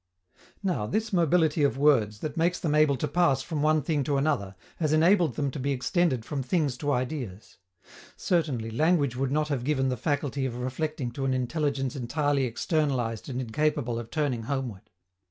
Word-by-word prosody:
Now, 170 - -1
this 215 - -2
mobility 165 -3 +3
of 140 -2 +2
words, 115 -8 +3
that 150 -1 -4
makes 170 +2 +1
them 155 -3 -1
able 150 -2 +4
to 150 - -1
pass 145 -4 +2
from 155 -2 -3
one 155 0 +3
thing 150 -1 0
to 145 -2 +1
another, 135 -10 0 0.2
has 155 -2 0
enabled 165 - +4
them 140 0 -1
to 140 - -6
be 135 +2 -1
extended 130 -2 0
from 140 0 -3
things 145 -1 0
to 145 +2 -1
ideas. 125 -6 -4 0.6
Certainly, 140 -11 0
language 145 0 +2
would 135 +1 -1
not 150 +1 0
have 135 -4 -1
given 135 -1 +1
the 130 - 0
faculty 140 0 -1
of 120 - -6
reflecting 130 +1 -3
to 135 +3 -4
an 130 -1 +1
intelligence 135 +1 -1
entirely 140 +2 0
externalized 125 - -1
and 125 -1 -3
incapable 125 -1 -1
of 115 -1 -8
turning 145 -6 -1
homeward. 120 -5 -4
140 Hz, 180 wpm, -27 LUFS, 125-155 Hz, 0.6 s, able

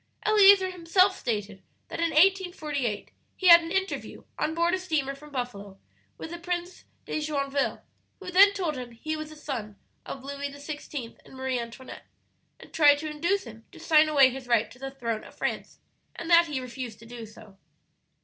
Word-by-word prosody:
"Eleazer 400 -3 +6
himself 370 +2 +3
stated 205 -4 -4 0.3
that - - -6
in 335 0 +1
1848 310 - +1 0.3
he 375 - 0
had 340 0 +10
an 330 0 -7
interview, 385 +1 -3 0.2
on 315 - -1
board 340 +1 +2
a 375 - +1
steamer 310 -7 -1
from 300 +2 -13
Buffalo, 215 -8 -6 0.4
with 320 - -8
the 345 - -6
Prince 350 +1 -5 0.2
de - - -3
Joinville, 280 -2 -1 0.4
who 375 -2 -7
then 395 +3 +7
told 345 -8 -2
him 245 -2 -7
he 310 +7 -4
was 310 0 -6
the 310 - -12
son 240 -9 -6 0.3
of 265 - -8
Louis 280 +1 -5
XVI. 285 -3 -7
and - - -15
Marie 260 -1 -2
Antoinette, 235 +2 -9 0.5
and - - -15
tried 290 -2 +6
to 310 +1 -5
induce 340 +7 0
him 225 -2 -12
to 345 - -14
sign 315 -1 +4
away 275 -4 +6
his 260 0 -8
right 235 -2 +2
to 250 - -15
the 270 0 -5
throne 230 -5 -4
of - - -14
France, - - -3 0.4
and 335 - -5
that 335 0 +7
he 290 -4 -3
refused 250 -3 -7
to 230 - -15
do 230 -1 -9
so. 215 -2 -16
290 Hz, 190 wpm, -27 LUFS, 250-340 Hz, 0.5 s, had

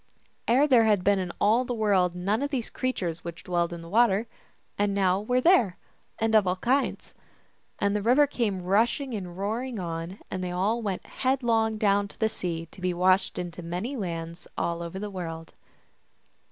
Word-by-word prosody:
Ere 250 +5 +4
this 300 - +2
there 235 -3 +6
had 205 -4 +3
been 200 0 +3
in 180 -2 -3
all 220 +5 +4
the 245 -1 -3
world 195 -5 +2
none 200 +6 0
of 285 - -1
the 275 -3 0
creatures 180 -11 -2
which 170 0 -7
dwell 175 -1 0
in 170 -1 -8
the - - -10
water, 220 +2 +3 0.5
and 205 -1 0
now 190 -1 +2
they 210 - -11
were 250 0 +3
there, 250 - +4 0.4
and 225 0 0
of 215 -3 +5
all 180 - +2
kinds. 255 +8 -1 0.6
And 200 0 +1
the 210 - 0
river 250 +7 +5
came 215 -9 -2
rushing 235 +8 +1
and 180 -4 -5
roaring 225 +5 -2
on, 170 +1 -5
and 185 -1 -3
they 180 - -2
all 200 +6 0
went 200 -4 -3
head 265 0 -1
long 225 -2 +2
down 205 -1 +2
to - - -16
the 220 - +2
sea, 170 -5 -4
to 190 - -14
be 180 -1 0
washed 185 +2 +2
into 175 0 -5
many 180 +11 -4
lands 170 -5 -5
over - - +1 0.2
all 170 - -5
the 200 +4 -6
world. 165 -3 -6
200 Hz, 200 wpm, -27 LUFS, 180-230 Hz, 0.6 s, there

